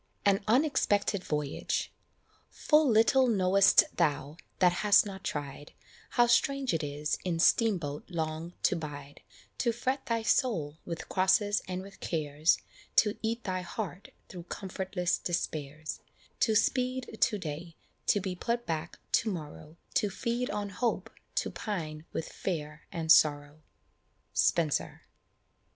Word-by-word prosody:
AN 200 -1 +3
UNEXPECTED 220 -6 +2
VOYAGE. 150 -2 -2 0.6
Full 300 -2 +3
little 240 +4 +5
know'st 195 -2 +5
thou, 150 -3 0 0.2
that 180 -1 +4
hast 210 0 +6
not 190 -2 -7
tried, 145 0 -5 0.4
How 240 - +7
strange 270 +2 +2
it 165 - 0
is 150 0 -2
in 175 -3 -1
"steam 215 +4 +4
boat" 145 -3 -6
long 160 0 -3
to - - +3
bide, 145 -3 -7 0.4
To 240 - +2
fret 260 +4 -2
thy 230 -2 0
soul 165 - +1
with 170 -1 -5
crosses 200 +2 +2
and 185 0 -4
with 195 +1 -13
cares, 155 0 +1 0.4
To 210 -1 +4
eat 230 +1 -2
thy 185 -2 -2
heart 180 +1 -6 0.2
through 175 -2 -9
comfortless 190 -1 -2
despairs, 155 -3 -3 0.4
To 220 - +3
speed 255 +1 0
to 210 - +3
day 165 -1 -6 0.3
to 205 - +4
be 185 -1 -3
put 235 +6 -2
back 160 0 -3
to 220 - +2
morrow 155 -2 -8 0.2
To 210 - +2
feed 240 +5 -2
on 205 -1 -3
hope 235 +5 -2 0.2
to - - 0
pine 160 -7 -5
with 160 - -3
fear 150 -4 -5
and 160 -2 0
sorrow. 145 0 +4 0.7
Spenser. 160 -4 +1
185 Hz, 135 wpm, -30 LUFS, 155-220 Hz, 0.7 s, How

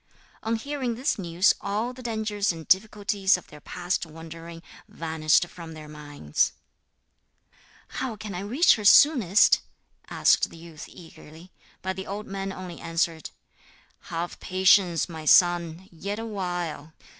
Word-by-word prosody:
On 225 +1 -1
hearing 255 0 -3
this 255 -1 -1
news 175 +1 +2
all 215 +5 -2
the 255 - -12
dangers 215 -4 -1
and 165 -2 -9
difficulties 200 -1 +2
of 180 - -13
their 150 0 -15
past 180 +4 -3
wandering 165 +1 -10 0.2
vanished 160 0 +1
from 170 -2 -11
their 155 -1 -10
minds. 145 - -2 1.3
'How 255 -4 -4
can 210 -1 -8
I 180 - -4
reach 235 - +3
her 210 - -6
soonest?' 215 - +6 0.5
asked - - +3
the - - -13
youth 165 -2 -11
eagerly. 165 +1 -14 0.3
But 190 0 -3
the 190 - -6
old 205 +2 -5
man 195 0 -5
only 185 -2 -8
answered: 165 -1 -2 0.8
'Have 170 +1 -5
patience, 185 -2 +3
my 160 -3 -8
son, 175 +2 +3
yet 200 +5 -5
awhile. 175 -8 -4
180 Hz, 135 wpm, -26 LUFS, 165-205 Hz, 1.3 s, soonest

